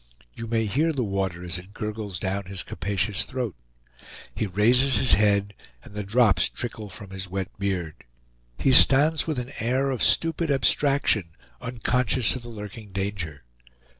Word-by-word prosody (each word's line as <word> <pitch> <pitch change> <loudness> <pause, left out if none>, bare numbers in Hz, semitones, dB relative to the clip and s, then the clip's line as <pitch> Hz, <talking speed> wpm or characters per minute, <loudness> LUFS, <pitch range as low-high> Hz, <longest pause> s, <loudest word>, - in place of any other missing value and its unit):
You 115 - -7
may 115 0 +1
hear 145 +11 +1
the 130 -4 -1
water 95 -4 -2
as 90 0 -3
it 95 +3 -14
gurgles 105 -3 -4
down 95 +2 -2
his 95 -1 -5
capacious 100 +2 -1
throat. 125 -7 -4 0.8
He 105 - -2
raises 120 +7 +4
his 125 +4 +4
head, 100 -1 +3 0.3
and - - -14
the 105 - -3
drops 100 -3 +3
trickle 110 -3 -6
from 95 0 -11
his 95 -1 -6
wet 95 +1 -3
beard. 90 -6 -3 0.5
He 135 - +2
stands 145 +5 +5
with 155 -4 -1
an 125 +1 -4
air 130 +4 +1
of 130 - -3
stupid 165 0 +2
abstraction, 135 - +2 0.3
unconscious 125 -2 0
of 130 - -5
the 120 - -10
lurking 105 -1 -9
danger. 95 -7 -4
105 Hz, 160 wpm, -25 LUFS, 95-125 Hz, 0.8 s, stands